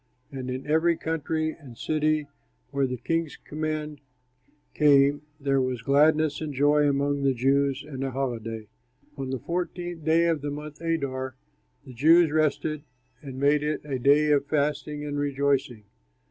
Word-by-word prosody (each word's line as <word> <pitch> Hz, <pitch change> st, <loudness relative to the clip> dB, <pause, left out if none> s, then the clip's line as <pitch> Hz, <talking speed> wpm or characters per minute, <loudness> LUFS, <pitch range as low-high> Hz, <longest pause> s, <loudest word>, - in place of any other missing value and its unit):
And 130 Hz, -2 st, -5 dB
in 130 Hz, +1 st, -4 dB
every 160 Hz, +2 st, +2 dB
country 160 Hz, 0 st, -2 dB
and 135 Hz, -8 st, -13 dB
city, 155 Hz, -1 st, 0 dB, 0.5 s
where 140 Hz, -1 st, +1 dB
the 125 Hz, 0 st, -4 dB
king's 165 Hz, +4 st, -2 dB
command 155 Hz, -1 st, -4 dB, 0.7 s
came, 145 Hz, -1 st, +4 dB, 0.2 s
there 135 Hz, -1 st, +1 dB
was 130 Hz, -3 st, -2 dB
gladness 150 Hz, +3 st, +3 dB
and 150 Hz, -3 st, -4 dB
joy 145 Hz, +2 st, +4 dB
among 140 Hz, 0 st, 0 dB
the 135 Hz, -1 st, +2 dB
Jews, 140 Hz, +2 st, +1 dB
and 135 Hz, -3 st, -5 dB
a 135 Hz, -, -1 dB
holiday. 115 Hz, -4 st, -4 dB, 0.5 s
On 135 Hz, -2 st, -5 dB
the 130 Hz, -, -2 dB
fourteenth 175 Hz, +2 st, -4 dB
day 165 Hz, +2 st, +3 dB
of 165 Hz, -3 st, +1 dB
the 145 Hz, -, -3 dB
month 150 Hz, +1 st, -7 dB
Adar, 135 Hz, -6 st, -2 dB, 0.5 s
the 130 Hz, -, -11 dB
Jews 160 Hz, +5 st, +5 dB
rested 155 Hz, 0 st, 0 dB, 0.4 s
and 135 Hz, -4 st, -8 dB
made 145 Hz, +1 st, +3 dB
it 150 Hz, +1 st, -2 dB
a 135 Hz, -3 st, -3 dB
day 145 Hz, +4 st, +4 dB
of 140 Hz, -1 st, +2 dB
feasting 150 Hz, 0 st, -1 dB
and 145 Hz, -1 st, -3 dB
rejoicing. 140 Hz, -5 st, 0 dB
145 Hz, 155 wpm, -26 LUFS, 135-155 Hz, 0.7 s, Jews